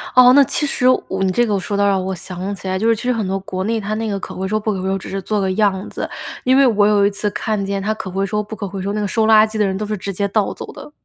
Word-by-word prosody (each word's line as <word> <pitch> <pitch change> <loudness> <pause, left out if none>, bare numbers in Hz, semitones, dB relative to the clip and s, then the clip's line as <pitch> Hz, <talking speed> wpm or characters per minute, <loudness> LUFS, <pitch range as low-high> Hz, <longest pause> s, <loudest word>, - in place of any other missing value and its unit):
哦， 250 0 +8
那 280 +1 +7
其 285 +3 -1
实 255 -3 +1 0.2
我 190 0 -2
你 190 - +2
这 240 +6 +2
个， 205 -3 0
说 200 +2 -4
的 200 - +2
倒 200 - +4
让 195 -2 +1
我 190 +1 -2
想 185 +2 -5
起 190 - -9
来， 190 0 0
就 225 - +1
是 230 - +4
其 220 - -8
实 250 0 +1
很 225 -3 -2
多 195 +1 -1
国 185 -1 -4
内 225 +3 0
它 210 0 -3
那 220 0 -2
个 200 -1 -2
可 - - -7
回 190 +1 -3
收 215 +2 0
不 215 0 -1
可 190 - -4
回 190 - -3
收， 195 - 0
只 190 - -9
是 195 0 -3
做 210 +3 -1
个 190 -1 0
样 200 -1 +1
子。 - - -5 0.3
因 260 +1 +4
为 275 - +6
我 210 -4 +4
有 205 -1 +4
一 205 - +2
次 205 +1 -2
看 215 -1 -2
见 195 0 -2
它 215 +2 0
可 215 -3 -7
回 195 +2 -1
收 210 +1 -1
不 210 +1 -7
可 205 - -5
回 195 0 -6
收， 200 +2 -2
那 210 - -1
个 205 - -1
收 220 +2 +1
垃 220 0 +6
圾 215 0 -6
的 210 - +2
人 190 -1 -1
都 210 - -3
是 210 0 -2
直 200 +1 -5
接 200 +2 -1
倒 200 0 0
走 - - -8
的。 - - -11
205 Hz, 380 characters per minute, -19 LUFS, 195-220 Hz, 0.3 s, 哦